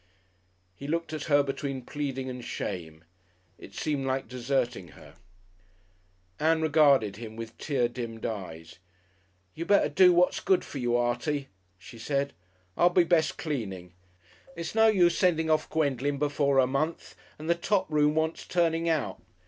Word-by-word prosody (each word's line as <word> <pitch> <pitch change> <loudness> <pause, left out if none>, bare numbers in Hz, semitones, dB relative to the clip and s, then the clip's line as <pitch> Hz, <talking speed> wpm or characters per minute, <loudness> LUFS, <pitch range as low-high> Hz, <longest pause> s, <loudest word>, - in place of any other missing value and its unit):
He 140 - -8
looked 165 +1 -2
at 155 -2 -4
her 145 -2 +4
between 135 -2 -4
pleading 135 -3 -4
and 125 -1 -6
shame. 80 -7 -5 0.6
It 100 - -13
seemed 145 -3 -2
like 130 0 -1
deserting 125 -6 -2
her. - - -15 1.3
Ann 160 +1 +3
regarded 140 -10 +4
him 110 -1 -8
with 115 0 -8
tear 130 -5 0
dimmed 115 -2 -6
eyes. 90 -7 -6 0.7
"You'd 165 +2 -6
better 205 - +4
do 185 -1 +6
what's 175 +1 +3
good 190 - +2
for 140 - -7
you, 120 -1 +1
Artie," 125 +4 -1 0.3
she 95 +5 -13
said.... 140 +4 -1 0.4
"I'll 175 - +5
be 175 0 +4
best 170 -2 +1
cleaning. 95 - -5 0.6
It's 170 0 -5
no 225 0 +5
use 175 -5 +4
sending 160 -3 +2
off 155 0 +1
Gwendolen 145 -2 0
before 140 -1 +1
her 130 - +5
month, 140 +6 -2 0.2
and 155 - -8
the 170 - +4
top 190 +3 0
room 150 0 +3
wants 160 +1 -1
turning 165 -1 +1
out." 160 -3 -1
140 Hz, 155 wpm, -28 LUFS, 120-160 Hz, 1.3 s, do